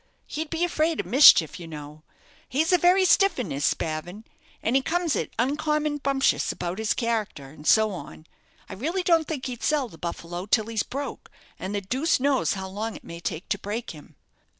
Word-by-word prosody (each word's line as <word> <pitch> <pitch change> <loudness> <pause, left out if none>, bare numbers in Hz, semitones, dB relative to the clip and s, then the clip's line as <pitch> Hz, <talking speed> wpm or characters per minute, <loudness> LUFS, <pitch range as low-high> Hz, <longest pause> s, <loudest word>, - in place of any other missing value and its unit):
He'd 310 0 -5
be 330 +1 -1
afraid 325 -2 0
of - - -2
mischief, 235 - +7
you 170 - -8
know. 150 -1 -9 0.5
He's 315 +7 +1
a 360 - +5
very 370 +2 +4
stiff 390 +2 +4
'un, 230 - -3
is 140 +1 -3
Spavin, 170 +10 -2 0.4
and 230 - +1
he 270 - +4
comes 340 +2 0
it - - -2
uncommon 300 +3 0
bumptious 275 -1 +1
about 175 +3 -4
his 220 0 0
character, 215 - -2
and 150 0 -11
so 220 -1 +5
on. 170 -3 -9 0.4
I - - -8
really 330 - -2
don't 330 -3 +3
think 285 -5 -4
he'd 245 -3 -5
sell 290 -5 +1
the 165 - -15
'Buffalo' 175 +2 -5
till 215 0 +3
he's 225 -1 -1
broke, 275 +5 -6 0.3
and 190 +3 -4
the 205 - -1
deuce 260 - 0
knows 275 0 +1
how 190 -1 -5
long 215 +3 -4
it - - -11
may 170 - -9
take 170 +1 -5
to 205 - 0
break 215 +5 -4
him." 150 -3 -14
230 Hz, 200 wpm, -25 LUFS, 180-300 Hz, 0.5 s, mischief